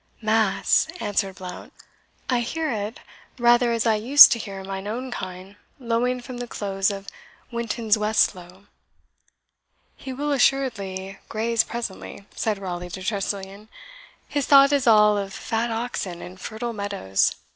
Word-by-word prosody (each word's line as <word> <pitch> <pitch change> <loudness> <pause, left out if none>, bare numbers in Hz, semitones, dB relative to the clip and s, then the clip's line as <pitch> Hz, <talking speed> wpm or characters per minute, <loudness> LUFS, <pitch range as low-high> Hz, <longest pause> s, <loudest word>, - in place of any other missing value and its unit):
"Mass!" 220 0 +2
answered 200 -2 -1
Blount, 180 -1 -9 0.5
"I 250 -2 +1
hear 310 +6 -2
it 210 0 -4 0.4
rather 240 0 +4
as 230 0 0
I 225 - +4
used 245 +7 +8
to 230 - +1
hear 195 -3 -7
mine 195 +1 -6
own 250 +4 -4
kine 185 -1 -7 0.2
lowing 250 0 -1
from 250 0 -8
the 245 - -5
close 195 -2 -1
of 195 -1 -6 0.4
Wittenswestlowe." 210 -5 0 1.3
"He 265 - -8
will 290 +3 -3
assuredly 200 -9 0
graze 225 +1 +1
presently," 210 -3 -6
said 215 -2 -1
Raleigh 180 -2 -5
to 185 +1 -7
Tressilian; 200 0 -4 0.6
"his 285 -2 -2
thought 275 0 +7
is 280 -3 +1
all 210 -2 +6
of 195 -1 -5
fat 230 +1 -2
oxen 225 -6 -4
and 185 +2 -10
fertile 235 +2 -5
meadows. 200 - 0
215 Hz, 135 wpm, -24 LUFS, 195-240 Hz, 1.3 s, used